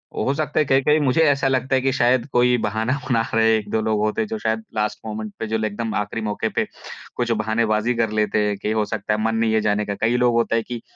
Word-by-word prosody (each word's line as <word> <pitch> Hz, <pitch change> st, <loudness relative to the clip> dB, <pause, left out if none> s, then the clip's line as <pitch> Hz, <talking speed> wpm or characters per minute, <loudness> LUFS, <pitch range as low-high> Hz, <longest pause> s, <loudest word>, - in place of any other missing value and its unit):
हो 135 Hz, -, 0 dB
सकता 150 Hz, +1 st, -1 dB
है 155 Hz, -, +3 dB
कहीं-कहीं 135 Hz, +3 st, +3 dB
मुझे 140 Hz, +2 st, +2 dB
ऐसा 140 Hz, -3 st, +3 dB
लगता 130 Hz, 0 st, +1 dB
है 130 Hz, -, +2 dB
कि 135 Hz, 0 st, +1 dB
शायद 120 Hz, -1 st, +2 dB
कोई 125 Hz, 0 st, +4 dB
बहाना 110 Hz, +3 st, -1 dB, 0.2 s
बना 115 Hz, -3 st, +3 dB
रहे 115 Hz, 0 st, +4 dB
हैं 110 Hz, -, +4 dB
1-2 110 Hz, +1 st, -2 dB
लोग 110 Hz, -1 st, 0 dB
होते 110 Hz, -, 0 dB
हैं 220 Hz, -, -2 dB
जो 225 Hz, +1 st, -4 dB
शायद 110 Hz, -, -1 dB
लास्ट 105 Hz, 0 st, -1 dB
मोमेंट 110 Hz, -1 st, -5 dB
पे 115 Hz, -, -3 dB
जो 110 Hz, +1 st, 0 dB
एकदम 110 Hz, +1 st, -3 dB
आख़िरी 105 Hz, +3 st, -2 dB
मौके 105 Hz, -1 st, -2 dB
पे -, -, -1 dB, 0.5 s
कुछ 120 Hz, -1 st, -1 dB
बहानेबाज़ी 110 Hz, +1 st, +1 dB
कर 115 Hz, -1 st, +1 dB
लेते 105 Hz, 0 st, +1 dB
हैं 105 Hz, -1 st, 0 dB
कि 105 Hz, -, -3 dB
हो 110 Hz, -1 st, +1 dB
सकता 105 Hz, -, -2 dB
है 105 Hz, -, -1 dB
मन 110 Hz, 0 st, 0 dB
नहीं 110 Hz, -1 st, +1 dB
है 110 Hz, -, +2 dB
जाने 105 Hz, 0 st, 0 dB
का। 100 Hz, -, -3 dB
कई 115 Hz, +4 st, 0 dB
लोग 125 Hz, -1 st, +3 dB
होता 115 Hz, -1 st, +1 dB
हैं 115 Hz, -, +1 dB
कि 120 Hz, -2 st, -5 dB
115 Hz, 265 wpm, -22 LUFS, 110-125 Hz, 0.5 s, कोई